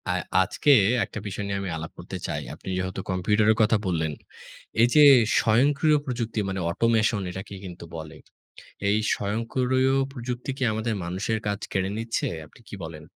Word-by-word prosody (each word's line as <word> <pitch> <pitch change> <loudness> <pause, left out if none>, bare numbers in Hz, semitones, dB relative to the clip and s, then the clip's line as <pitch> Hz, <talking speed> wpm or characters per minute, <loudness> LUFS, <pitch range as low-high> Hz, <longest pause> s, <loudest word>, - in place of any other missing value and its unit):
আর 90 0 +1 0.2
আজকে 145 +9 +1 0.3
একটা - - -7
বিষয় 105 +1 -4
নিয়ে 100 -3 -3
আলাপ 80 0 -6
করতে - - -6
চাই। - - -3
আপনি - - -9
যেহেতু 95 +1 -3
কম্পিউটারের 105 +4 +3
কথা 110 0 +4
বললেন, 80 -4 -1 0.7
এই 120 - +6
যে, 150 - +7 0.4
স্বয়ংক্রিয় 140 +7 +3
প্রযুক্তি 115 -4 -3
মানে 95 0 -3
অটোমেশন 110 +1 +2
এটাকে 95 +2 -8
কিন্তু 90 -2 -9
বলে। 80 -2 -8 0.7
এই 105 - +3 0.2
স্বয়ংক্রিয় 125 +5 0 0.2
প্রযুক্তি 125 0 -5
কি 135 - -2
আমাদের 110 +1 -1
মানুষের 95 +6 -2
কাজ 100 0 -1
কেড়ে 95 -1 0
নিচ্ছে? 115 0 -2 0.2
আপনি - - -21
কি - - -7
বলেন? 80 -1 -8
105 Hz, 155 wpm, -25 LUFS, 95-115 Hz, 0.7 s, যে